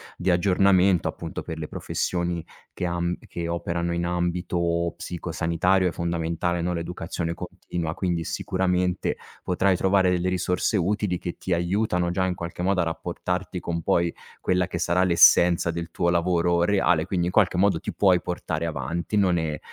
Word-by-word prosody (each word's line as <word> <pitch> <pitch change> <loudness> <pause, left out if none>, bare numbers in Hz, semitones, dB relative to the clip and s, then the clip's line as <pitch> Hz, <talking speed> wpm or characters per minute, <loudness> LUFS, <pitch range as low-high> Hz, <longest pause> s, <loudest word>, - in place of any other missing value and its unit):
di 90 - -2
aggiornamento 95 0 +3
appunto - - -5
per 80 - -6
le 80 - -5
professioni 85 0 -2 0.3
che 90 - -4
am 85 0 -1
che 85 -1 -4
operano 85 0 -2
in 85 0 -1
ambito 85 -1 -1
psico 85 -1 -6
sanitario 90 +3 +2
è - - 0
fondamentale, 85 +1 -1
no, 90 +1 -1
l'educazione 85 0 -4
continua. 90 -2 -5
Quindi, 85 -3 -1
sicuramente 90 0 -1 0.3
potrai 95 +1 +2
trovare 95 0 +3
delle 90 0 +1
risorse 90 +3 0
utili 95 0 0
che 85 0 -5
ti 95 - -6
aiutano 90 0 0
già 95 +1 0
in 90 -1 -1
qualche 85 +1 -6
modo 95 +1 +1
a - - +2
rapportarti 90 +3 -3
con 85 -1 -3
poi 85 +1 +1 0.3
quella 90 0 +1
che 90 - -4
sarà 85 +2 +2
l'essenza 85 -1 +5
del 85 0 -5
tuo 85 +1 0
lavoro 85 0 +2
reale, 90 -4 +2
quindi 90 -3 0
in 90 - -1
qualche 95 -3 +3
modo 95 -3 +3
ti - - -5
puoi 90 -3 +3
portare 85 -2 -3
avanti, 85 +7 -3
non 90 -4 +3
è 80 -2 -2
90 Hz, 165 wpm, -25 LUFS, 85-90 Hz, 0.3 s, l'essenza